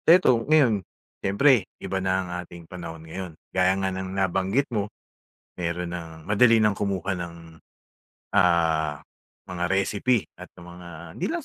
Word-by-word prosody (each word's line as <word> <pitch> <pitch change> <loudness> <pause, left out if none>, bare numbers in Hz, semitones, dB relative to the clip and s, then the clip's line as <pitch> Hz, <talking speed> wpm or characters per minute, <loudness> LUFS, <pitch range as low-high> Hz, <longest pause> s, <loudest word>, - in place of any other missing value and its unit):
Eto 165 -9 +6
ngayon, 130 -10 +5 0.4
siyempre 105 +2 +4
iba 95 0 -3
na 95 0 +1
ang - - -9
ating 85 -1 -12
panahon 85 -2 -8
ngayon. 85 0 -7 0.2
Gaya 95 +1 +3
nga 95 -1 -1
ng 95 0 -5
nabanggit 95 +7 +1
mo, 105 -2 -1 0.7
mayro'n 85 0 -2
nang 85 -2 -5
madali 115 +5 +5
ng 105 - +4
kumuha 100 -2 -2
ng, 85 -1 -6 1.0
ah, 80 -5 +3 0.5
mga 90 -1 -3
recipe 100 +2 +1
at - - -11
ng 85 - -11
mga 90 0 -11 0.3
hindi - - -2
lang 345 - -1
95 Hz, 145 wpm, -25 LUFS, 85-100 Hz, 1.0 s, Eto